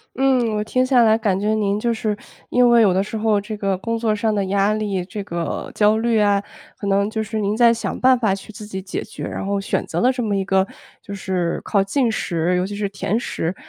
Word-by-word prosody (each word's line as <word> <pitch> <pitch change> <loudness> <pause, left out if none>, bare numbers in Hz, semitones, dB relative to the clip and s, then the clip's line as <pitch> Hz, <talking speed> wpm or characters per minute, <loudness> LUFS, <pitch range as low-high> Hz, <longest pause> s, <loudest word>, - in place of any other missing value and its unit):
嗯， 255 -4 +2
我 210 - 0
听 255 +4 +1
下 255 -2 +4
来 220 0 +5
感 205 -4 0
觉 210 +2 +1
您 205 -1 0
就 235 +1 0
是， 215 -2 -2 0.3
因 250 0 +4
为 235 -1 +6
有 205 - +5
的 190 +1 +2
时 215 - -7
候 215 -1 +2
这 210 +2 -6
个 195 -2 -1
工 230 +4 -2
作 225 -1 +1
上 220 0 0
的 200 -2 0
压 200 +2 +2
力， 205 -4 -2
这 200 +2 -6
个 170 -3 -4
焦 210 +1 +4
虑 230 -1 +2
啊， 205 -1 +3 0.4
可 200 - -5
能 200 +1 +2
就 220 0 -2
是 215 +1 -3
您 205 0 0
在 235 0 +6
想 225 -4 -3
办 255 0 +5
法 215 -5 +2
去 195 +2 -7
自 210 0 -9
己 190 -2 -6
解 185 - -5
决， - - -9
然 - - -4
后 200 0 -1
选 195 - -1
择 - - -2
了 250 - +4
这 250 -2 -3
么 210 -2 0
一 195 - 0
个 190 0 +2 0.3
就 200 - -9
是 185 -3 -2
靠 200 -2 +2
进 240 +4 +1
食， 175 -4 -1
尤 180 - 0
其 205 - -5
是 205 -1 -2
甜 200 +2 -1
食， 175 -6 -3
210 Hz, 270 characters per minute, -21 LUFS, 195-225 Hz, 0.4 s, 为